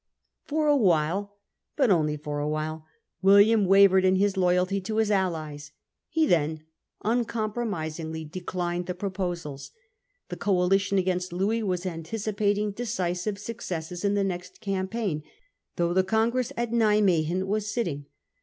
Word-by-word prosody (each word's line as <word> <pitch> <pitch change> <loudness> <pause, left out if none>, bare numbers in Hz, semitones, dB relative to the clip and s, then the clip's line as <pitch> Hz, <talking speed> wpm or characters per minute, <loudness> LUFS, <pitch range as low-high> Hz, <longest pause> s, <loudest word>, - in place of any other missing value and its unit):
For 305 +1 0
a 295 -1 +5
while, 195 - +1 0.4
but 265 -7 +3
only 150 -4 +2
for 145 0 -4
a 145 +1 -1
while, 155 +1 -3 0.3
William 200 +2 +6
wavered 195 0 +6
in 185 0 +4
his 200 +1 +2
loyalty 185 +1 +2
to 215 +3 -4
Ms 220 -1 +2
allies; 155 -6 -2 0.4
he 320 0 +2
then 155 - +1 0.4
un 235 +3 +2
Wiiiiam - - -13
compromisingly 170 -8 -3
declined 175 +1 -3
the 180 - -3
proposals. 175 -7 -4 0.6
The - - -5
TouiS - - -22
coalition 195 +1 +2
against 180 -1 0
Louis 200 +6 0
was 185 -3 -2
anticipating 205 +4 -1
de 205 - -8
offers. 235 -1 -3
cisive 180 +3 -2
successes 180 -5 -5
in 200 0 +2
the 200 - +2
next 185 -1 -5
campaign, 195 -3 -2 0.5
though 170 0 0
the 190 +1 +3
congress 230 +5 +1
at 235 -1 -1
Nimwegen 195 -7 +2
was 210 +2 -1
sitting. 160 -12 -3
190 Hz, 150 wpm, -26 LUFS, 170-210 Hz, 0.6 s, William